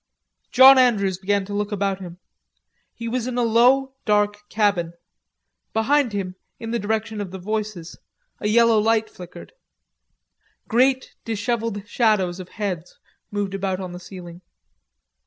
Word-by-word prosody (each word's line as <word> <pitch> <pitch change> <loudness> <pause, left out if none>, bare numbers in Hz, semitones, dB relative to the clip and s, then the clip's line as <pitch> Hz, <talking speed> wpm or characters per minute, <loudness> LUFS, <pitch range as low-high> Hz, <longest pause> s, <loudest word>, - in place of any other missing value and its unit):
John 265 +1 +8
Andrews 200 -7 +2
began 200 0 0
to 205 - -7
look 205 +1 -2
about 195 -1 -1
him. 175 -2 -9 0.8
He 230 - -6
was 245 +1 -2
in 250 -1 -3
a 245 - +2
dark 235 -3 +2
low 205 - -24
cabin. 200 -6 +1 0.8
Behind 250 +3 +2
him, 190 -2 -4 0.2
in 225 0 -6
the 235 - 0
direction 220 +1 -2
of 200 - -5
the 190 - -7
voices, 210 -3 -5 0.4
a - - -2
yellow 230 0 +4
light 220 0 +1
flickered. 180 -1 -12 1.1
Great 260 +3 +2
dishevelled 225 -2 -3
shadows 210 -7 +1
of 185 -1 -9
heads 185 -5 -5 0.3
moved 205 -2 -3
about 195 -1 -2
on 185 -2 -6
the 175 - -8
ceiling. 175 -1 -11
210 Hz, 140 wpm, -22 LUFS, 190-230 Hz, 1.1 s, John